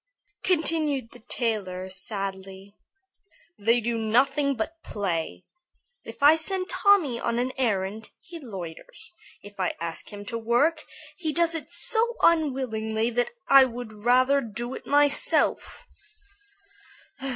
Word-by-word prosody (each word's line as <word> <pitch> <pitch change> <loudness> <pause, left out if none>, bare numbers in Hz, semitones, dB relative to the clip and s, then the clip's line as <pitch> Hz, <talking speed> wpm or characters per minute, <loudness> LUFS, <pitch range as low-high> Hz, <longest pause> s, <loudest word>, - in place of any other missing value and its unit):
continued 310 -8 0
the - - -14
tailor, 210 -6 -3
sadly. 195 0 -6 0.8
"They 230 +4 +3
do 235 0 -2
nothing 275 +6 +2
but 325 +9 -5
play. 165 - -3 0.6
If - - -9
I 295 +2 +8
send 370 +3 -2
Tommy 360 - +3
on 235 0 -1
an 250 +2 0
errand, 215 -3 -1
he 340 -2 -11
loiters. 190 - -8 0.3
If 205 0 -13
I 185 - 0
ask 165 -1 -5
him 205 0 -9
to 230 +3 -4
work, 280 +8 +2 0.4
he 320 -4 -2
does 335 +1 +1
it 325 - -5
so 470 +1 0
unwillingly 240 -8 +1
that 245 +1 0 0.2
I 275 -1 +8
would 240 -2 -7
rather 255 +3 +4
do 240 +2 -5
it - - -9
myself. 290 - +1
240 Hz, 125 wpm, -26 LUFS, 205-290 Hz, 0.8 s, I